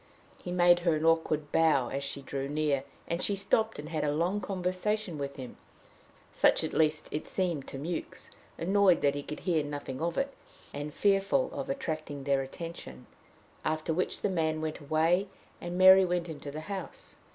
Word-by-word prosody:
He 180 - -5
made 175 -1 +5
her 170 -2 +2
an 155 +1 -1
awkward 155 -2 +2
bow 155 -6 +3
as 140 +1 -3
she 140 0 -4
drew 135 0 -4
near, 145 -2 0 0.2
and 170 +1 -2
she 205 - +1
stopped 220 +3 +1
and 150 +1 -7
had 160 -2 -2
a 150 - +1
long 175 +7 0
conversation 185 -1 -2
with 140 0 -4
him 130 -3 -8 0.8
such - - +4
at - - -3
least 155 -1 +2
it 150 - -4
seemed 175 -7 -2
to - - -7
Mewks, 160 +5 -5 0.3
annoyed 190 0 +3
that 140 -1 +3
he 145 - -3
could 150 - -7
hear 165 -5 +1
nothing 145 -2 -5
of 170 0 -1
it, 275 0 -1 0.4
and 145 +1 -5
fearful 200 - +2
of - - -5
attracting 155 - -4
their 140 0 +2
attention 135 - -8 0.6
after 155 +1 -1
which 180 +3 -1
the 205 - +1
man 160 -4 0
went 155 -1 -3
away, 160 +6 +2 0.3
and 175 +1 -4
Mary 190 +1 +9
went 175 -1 -1
into 150 -3 -7
the 150 +2 -6
house. 190 +2 -7
160 Hz, 185 wpm, -30 LUFS, 145-185 Hz, 0.8 s, Mary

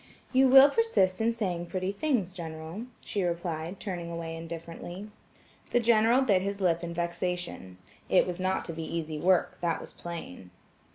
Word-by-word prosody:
"You 260 0 +5
will 270 +2 +9
persist 255 - +2
in 230 +1 +3
saying 180 -7 -2
pretty 185 +1 -2
things, 205 - 0
General," 165 +5 -7
she 205 - -3
replied, 170 0 -3
turning 175 -4 -5
away 165 -1 -5
indifferently. 170 +4 -7 0.6
The 245 - +3
General 235 +2 +4
bit 200 -7 +3
his 200 +1 -3
lip 175 -3 +1
in 170 - -4
vexation. 170 - -3 0.3
It 185 - +5
was 180 0 -4
not 185 +1 0
to 165 - -4
be 165 - -5
easy 160 -2 -4
work, 180 +2 +2
that 170 -2 0
was - - -10
plain. 165 - -8
180 Hz, 165 wpm, -29 LUFS, 170-205 Hz, 0.6 s, will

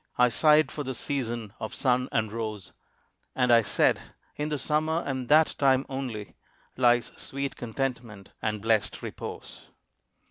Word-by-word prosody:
I 125 0 +5
sighed 150 +5 +4
for 150 - -4
the 130 -1 -4
season 120 -6 -3
of 110 - -5
sun 125 -1 +1
and 110 -1 0
rose, 110 -4 -5 0.6
And 125 -2 +3
I 115 - +7
said, 105 - +3 0.4
"In 150 +1 -2
the 150 - -1
Summer 155 +4 0
and 130 -3 -3
that 155 +1 +5
time 135 -1 +3
only 125 -7 -5 0.4
Lies 120 -1 +3
sweet 140 0 -4
contentment 120 -4 -4
and 105 -2 -2
blest 110 -2 +1
repose." - - -8
125 Hz, 145 wpm, -27 LUFS, 115-140 Hz, 0.6 s, I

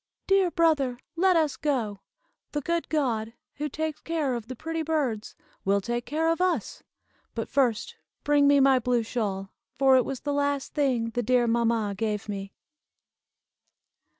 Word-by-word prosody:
"Dear 390 -2 +3
brother, 310 -8 +2 0.2
let 370 +2 +3
us 310 -3 +1
go! 235 -9 -1 0.5
The 295 - -1
good 340 +3 -2
God, 230 -7 0 0.2
who 300 +1 -2
takes 315 +1 -3
care 315 -5 -1
of 235 -2 -5
the 255 - -6
pretty 325 +5 -3
birds, 290 -9 -1 0.3
will 200 +1 +2
take 240 +4 -3
care 320 +2 +1
of 330 - -1
us. 365 -1 0 0.5
But - - -3
first 270 - 0 0.3
bring 290 -1 +4
me 285 0 +6
my 270 -1 +5
blue 245 -1 +1
shawl, 200 -4 -3 0.2
for 265 -1 +5
it 255 - +4
was 270 0 -5
the 290 0 -2
last 285 -1 -1
thing 250 -6 +1
the 245 - -1
dear 245 +1 +3
mamma 230 -3 +1
gave 210 +1 -2
me." 195 -1 -5
265 Hz, 160 wpm, -27 LUFS, 230-305 Hz, 0.5 s, me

